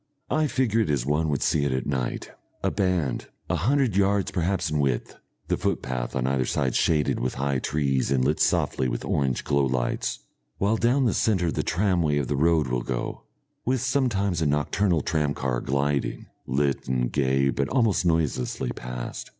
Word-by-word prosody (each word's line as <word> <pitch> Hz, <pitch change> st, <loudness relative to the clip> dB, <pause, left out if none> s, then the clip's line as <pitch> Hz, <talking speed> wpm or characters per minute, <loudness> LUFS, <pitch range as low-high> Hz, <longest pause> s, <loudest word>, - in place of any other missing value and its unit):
I 155 Hz, 0 st, +2 dB
figure 125 Hz, -5 st, +1 dB
it 95 Hz, -, 0 dB
as 70 Hz, -5 st, 0 dB
one 75 Hz, +3 st, +1 dB
would 70 Hz, -3 st, 0 dB
see 75 Hz, -, +2 dB
it 70 Hz, -, 0 dB
at 65 Hz, -1 st, -1 dB
night, 65 Hz, -4 st, -3 dB, 0.3 s
a -, -, +1 dB
band 90 Hz, -, 0 dB, 0.2 s
a -, -, +2 dB
hundred 120 Hz, -, +1 dB
yards 100 Hz, 0 st, +2 dB
perhaps 90 Hz, -1 st, 0 dB
in 75 Hz, -, 0 dB
width, 65 Hz, -4 st, -1 dB, 0.3 s
the -, -, 0 dB
footpath 65 Hz, -2 st, -2 dB
on 65 Hz, -1 st, 0 dB
either 65 Hz, 0 st, +1 dB
side 65 Hz, 0 st, 0 dB
shaded 75 Hz, -3 st, +2 dB
with 65 Hz, -, -2 dB
high 70 Hz, 0 st, 0 dB
trees 70 Hz, -2 st, 0 dB
and 65 Hz, -2 st, +2 dB
lit -, -, +1 dB
softly 65 Hz, -, +1 dB
with -, -, -3 dB
orange 65 Hz, -3 st, 0 dB
glowlights; 65 Hz, -3 st, 0 dB, 0.4 s
while 105 Hz, +3 st, +1 dB
down 125 Hz, +4 st, +2 dB
the 115 Hz, -, +2 dB
centre 90 Hz, -7 st, +1 dB
the -, -, -1 dB
tramway 85 Hz, -5 st, +1 dB
of 70 Hz, -3 st, -1 dB
the -, -, 0 dB
road 80 Hz, +1 st, +3 dB
will 60 Hz, -1 st, -1 dB
go, -, -, -4 dB, 0.4 s
with 130 Hz, -1 st, 0 dB
sometimes 110 Hz, -, +1 dB
a 80 Hz, -, +2 dB
nocturnal 80 Hz, +4 st, +1 dB
tram 75 Hz, -2 st, 0 dB
car 65 Hz, -2 st, -1 dB
gliding, 70 Hz, +1 st, -1 dB, 0.2 s
lit 70 Hz, +1 st, 0 dB
and 60 Hz, -1 st, 0 dB
gay 70 Hz, -1 st, +2 dB
but 70 Hz, +2 st, -1 dB
almost 115 Hz, -8 st, +2 dB
noiselessly, 80 Hz, -8 st, 0 dB
past. 60 Hz, -1 st, -6 dB
75 Hz, 180 wpm, -25 LUFS, 65-95 Hz, 0.4 s, road